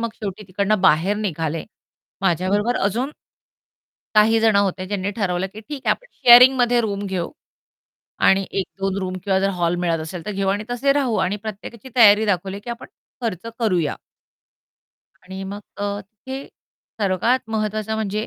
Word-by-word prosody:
मग 230 - -1
शेवटी 205 -1 -6
तिकडून 200 +2 0
बाहेर 190 +2 +3
निघाले. 165 -6 -2 0.6
माझ्याबरोबर 195 +6 +1
अजून 240 +8 0 1.1
काही 220 +1 +5
जणं 220 -2 +4
होते 190 -2 -1
ज्यांनी 200 0 -2
ठरवलं, 190 -3 -1
की 215 - -9
ठीक 280 +5 -7
आहे - - +4
आपण - - -1
शेअरिंगमध्ये 245 0 +7
रूम 205 -3 -2
घेऊ. 185 -3 -3 0.9
आणि 195 0 +4
1-2 195 0 -3
रूम 185 -1 -3
किंवा 190 -1 +2
जर 195 +1 +1
हॉल 170 0 +1
मिळत 175 -2 0
असेल, 160 +2 -7
तर 210 - -3
घेऊ 195 -1 -2
आणि 205 +2 -1
तसे 245 +3 +1
राहू 270 -5 +1
आणि 200 +3 -2
प्रत्येकाची 220 +4 -8
तयारी 215 -2 +7
दाखवली, 195 0 -1
की 240 - -10
आपण 235 +1 -6 0.3
खर्च 225 -4 -3
करूया. 180 -9 +1 1.3
आणि 190 +1 -8
मग 205 - -7 0.2
अ, 205 0 -3 0.3
ते 265 +1 -5 0.6
सर्वात 215 +5 +1
महत्वाचं 215 0 -2
म्हणजे, 215 0 -2
205 Hz, 155 wpm, -21 LUFS, 190-225 Hz, 1.3 s, शेअरिंगमध्ये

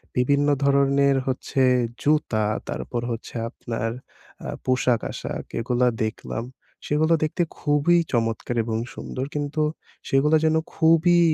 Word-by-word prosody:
বিভিন্ন 140 +3 +2 0.2
ধরনের 140 0 +3
হচ্ছে 130 +1 -1 0.4
জুতা 145 -8 +1 0.2
তারপর 120 -1 -3
হচ্ছে 115 - -6
আপনার 115 -1 -4 0.6
আ - - -4 0.2
পোশাক-আশাক 130 -2 -1 0.2
এগুলা 125 +2 +1 0.2
দেখলাম 110 +1 -4 0.4
সেগুলো 155 +3 +2
দেখতে 155 +3 0 0.2
খুবই 150 +4 +3
চমৎকার 115 0 -1
এবং 110 0 -2 0.2
সুন্দর 130 - -5
কিন্তু 145 +1 -1 0.5
সেগুলা 150 +4 +4
যেন 160 0 +3 0.2
খুবই 165 +2 +4
140 Hz, 110 wpm, -24 LUFS, 120-150 Hz, 0.6 s, সেগুলা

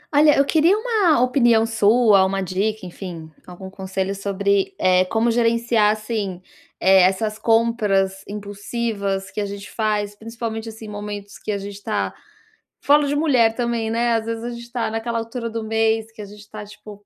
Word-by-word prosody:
Olha, 300 0 +6
eu 275 - +4
queria 325 +6 +3
uma 430 - +2
opinião 240 -3 +3
sua, 220 -2 +4
uma 195 +1 -1
dica, 195 +3 -2
enfim, 175 -3 -8 0.2
algum 185 +1 -10
conselho 190 0 -4
sobre, 200 - 0
eh, 185 0 +4
como 225 +5 +1
gerenciar, 230 -2 +2
assim, 215 -4 -3 0.4
eh, 190 0 +6
essas 205 +4 +1
compras 210 -5 +1
impulsivas 205 -1 -4
que 210 - -4
a - - -1
gente 200 0 -8
faz, 210 -2 -1
principalmente, 225 0 -6
assim, 220 0 -10
momentos 205 -1 -7
que - - -5
a 205 - -1
gente 200 0 -8
tá 215 -2 -2 0.7
falo 290 +1 +4
de 285 - -1
mulher 255 -8 +3
também, 235 -2 -1
né, 235 +1 +1
às 225 -1 0
vezes 230 0 -4
a - - -3
gente 235 0 -10
tá 240 -3 -2
naquela 230 +1 -2
altura 230 +1 -5
do 225 0 -4
mês 225 0 0
que 225 - -11
a - - -7
gente 210 +1 -14
tá, 215 -1 -8
tipo, 205 0 -13
220 Hz, 175 wpm, -21 LUFS, 200-230 Hz, 0.7 s, Olha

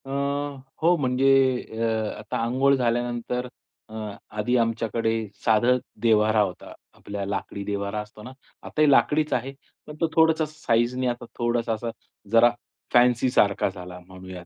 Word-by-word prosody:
अ, - - -10 0.7
हो 170 +2 +4
म्हणजे 135 -1 +2 0.4
अ, 110 -1 -2
आता 105 +1 -4
अंघोळ 130 +4 +3
झाल्यानंतर 120 0 -1 0.4
अ, - - -13 0.4
आधी 120 +4 0
आमच्याकडे 115 -1 0 0.3
साधं 120 +3 +4 0.2
देव्हारा 110 -1 +3
होता. 95 -3 -4 0.2
आपला 100 -1 -6
लाकडी 100 0 -4
देव्हारा 100 +1 -3
असतो 105 0 -13
ना, 125 - -9 0.3
आता 155 - -3
ही 150 - +6
लाकडीच 150 +2 +3
आहे 130 +3 -2 0.3
पण 150 - -9
तो 165 - +3
थोडासा 160 -1 +4
साईजनी 125 -4 0
आता 120 0 -3
थोडासा 120 -1 0
असा 115 +2 -4 0.4
जरा 115 +1 +6 0.4
फॅन्सीसारखा 120 -5 +3
झाला 90 -1 -9
म्हणूयात. 95 -1 -10
115 Hz, 135 wpm, -25 LUFS, 105-125 Hz, 0.7 s, ही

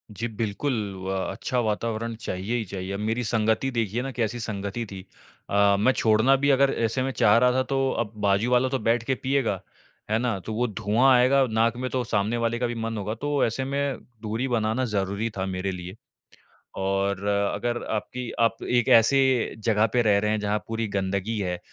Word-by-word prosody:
जी, 110 +3 -4
बिल्कुल, 115 +5 -2 0.3
व 95 - -3 0.2
अच्छा 125 +6 -2
वातावरण 115 +1 -2
चाहिए 100 +1 -3
ही 115 - -3
चाहिए, 95 0 -6
अब 100 - -4
मेरी 110 +3 -1
संगति 110 +3 +1
देखिए 115 -1 -1
ना 135 +1 -4
कैसी 120 -1 -2
संगति 105 +1 -4
थी। 95 -1 -7 0.5
अ, 100 0 +4
मैं 110 +6 +4
छोड़ना 110 +4 +4
भी 140 +1 +1
अगर 135 0 +4
ऐसे 115 +3 0
में 135 - -1
चाह 105 -3 +4
रहा 125 +1 +4
था 130 +1 +1
तो, 135 0 0
अब 110 -3 -2
बाजू 100 +3 +2
वाला 125 +1 +3
तो 135 0 -1
बैठ 115 +2 +1
के 130 +2 0
पिएगा, 125 -6 -1 0.5
है 110 - +2
ना? 120 -5 -1
तो 110 +4 -6
वो 120 +3 0
धुआँ 110 +4 +2
आएगा 130 +2 +4
नाक 115 +1 +1
में, 130 +1 -3
तो 130 -1 -1
सामने 110 +1 0
वाले 115 0 -1
का 125 - 0
भी 120 - -4
मन 115 0 -3
होगा, 105 +1 -3
तो 145 +3 0
ऐसे 115 +3 -2
में 140 -1 -1 0.2
दूरी 110 +4 -2
बनाना 115 +1 0
ज़रूरी 100 +3 -1
था 95 - -1
मेरे 95 0 -2
लिए। 90 +1 -7 0.9
और 95 +1 -1
अगर 100 +4 0
आपकी 120 +3 -3
आप 115 0 +3
एक 120 -1 +1
ऐसे 125 +2 +6 0.4
ज़गह 110 0 +2
पे 125 - +3
रह 105 -3 +4
रहे 105 +1 0
हैं, 110 0 0
जहाँ 105 0 0
पूरी 115 0 -2
गंदगी 100 +2 -2
है, 90 -3 -2
115 Hz, 200 wpm, -25 LUFS, 100-125 Hz, 0.9 s, ऐसे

